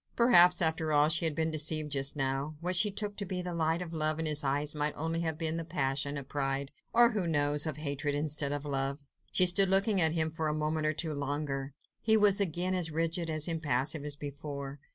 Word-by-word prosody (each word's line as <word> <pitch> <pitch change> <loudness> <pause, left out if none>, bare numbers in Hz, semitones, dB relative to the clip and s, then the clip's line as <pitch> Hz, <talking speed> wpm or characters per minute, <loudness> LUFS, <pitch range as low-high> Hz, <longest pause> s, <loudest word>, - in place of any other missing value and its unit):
Perhaps, 180 -8 +5
after 160 -1 0
all, 150 0 +4
she 160 +1 +1
had 160 -2 +1
been 160 0 -1
deceived 155 -1 +1
just 135 0 +2
now; 135 +2 -2
what 180 +2 -2
she 210 +4 +3
took 205 0 -3
to 205 - -3
be 185 -1 -4
the 180 -1 -5
light 165 +1 -1
of 170 -1 -9
love 155 0 0
in 160 - -2
his 150 -1 +2
eyes 145 +2 -1
might 150 0 -2
only 165 +2 -2
have 160 -2 -2
been 160 0 -2
the 165 - -3
passion 140 -3 -2
of 140 -2 -7
pride 135 -1 -3 0.2
or, 235 +1 +5
who 205 -6 -2
knows, 145 -1 +2
of 155 -2 -4
hatred 145 -1 -3
instead 145 -1 -1
of 145 0 -4
love. 140 0 -3 0.3
She 185 - +5
stood 185 +2 +6
looking 195 0 +2
at 160 -1 +5
him 160 -1 0
for 160 0 -3
a 150 - -1
moment 155 0 -1
or 155 - +1
two 155 0 -2
longer. 140 -1 -4 0.3
He 220 -1 +3
was 205 -1 +4
again 180 0 -1
as 180 -3 0
rigid, 165 +1 -2
as 155 0 -1
impassive, 150 -2 -1
as 145 -1 -3
before. 145 -1 -7
155 Hz, 230 wpm, -30 LUFS, 145-170 Hz, 0.3 s, stood